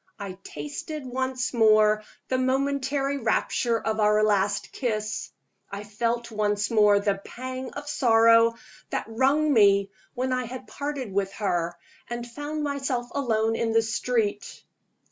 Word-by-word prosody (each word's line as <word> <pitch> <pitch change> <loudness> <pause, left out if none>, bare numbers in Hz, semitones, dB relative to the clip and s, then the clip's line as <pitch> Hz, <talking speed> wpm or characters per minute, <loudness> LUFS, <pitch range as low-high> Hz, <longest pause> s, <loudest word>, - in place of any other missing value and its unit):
I 195 -3 -7
tasted 150 - -6
once 260 0 -2
more 215 -2 +4 0.2
the 255 - 0
momentary 275 +1 0
rapture 230 0 +1
of 220 0 -2
our 210 0 +4
last 205 -1 +1
kiss; 215 -4 -3 0.4
I 200 +1 -6
felt 230 +3 -2
once 210 -1 0
more 210 -2 +5
the 200 -1 -1
pang 255 +1 -6
of 290 0 -7
sorrow 230 -4 +5 0.3
that - - -2
wrung 275 +6 +2
me 200 -3 +4 0.2
when 255 +1 -1
I 255 0 -1
had 255 +2 -8
parted 280 -8 -5
with 195 0 0
her 175 -4 -1 0.3
and 240 0 -4
found 295 +5 -5
myself 270 -4 -2
alone 225 -5 +1
in 225 -1 -1
the 225 0 +4
street. 225 -2 -2
230 Hz, 140 wpm, -26 LUFS, 210-260 Hz, 0.4 s, more